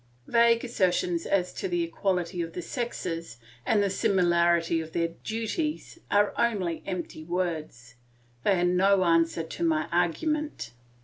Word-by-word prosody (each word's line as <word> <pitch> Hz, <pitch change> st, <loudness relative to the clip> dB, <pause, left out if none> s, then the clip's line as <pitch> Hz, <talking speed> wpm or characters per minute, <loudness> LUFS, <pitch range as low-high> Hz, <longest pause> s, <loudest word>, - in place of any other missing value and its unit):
Vague 235 Hz, 0 st, +4 dB
assertions 180 Hz, -6 st, 0 dB
as 180 Hz, -2 st, +1 dB
to 390 Hz, -, -3 dB
the 350 Hz, -2 st, 0 dB
equality 185 Hz, -, -1 dB
of 165 Hz, -1 st, -5 dB
the 180 Hz, -, -4 dB
sexes 170 Hz, -, -4 dB, 0.3 s
and 205 Hz, -2 st, +3 dB
the 200 Hz, -, +1 dB
similarity 170 Hz, -3 st, +2 dB
of 160 Hz, 0 st, -9 dB
their 170 Hz, 0 st, 0 dB
duties 230 Hz, -, -4 dB
are 205 Hz, 0 st, +3 dB
only 195 Hz, -8 st, 0 dB
empty 175 Hz, -4 st, -5 dB
words; 160 Hz, -9 st, -3 dB, 0.5 s
they 195 Hz, -3 st, +3 dB
are -, -, +1 dB
no 185 Hz, +2 st, +4 dB
answer 165 Hz, -1 st, +2 dB
to 160 Hz, -, -6 dB
my 155 Hz, -2 st, +1 dB
argument. 180 Hz, -, -1 dB
180 Hz, 140 wpm, -27 LUFS, 165-210 Hz, 0.5 s, Vague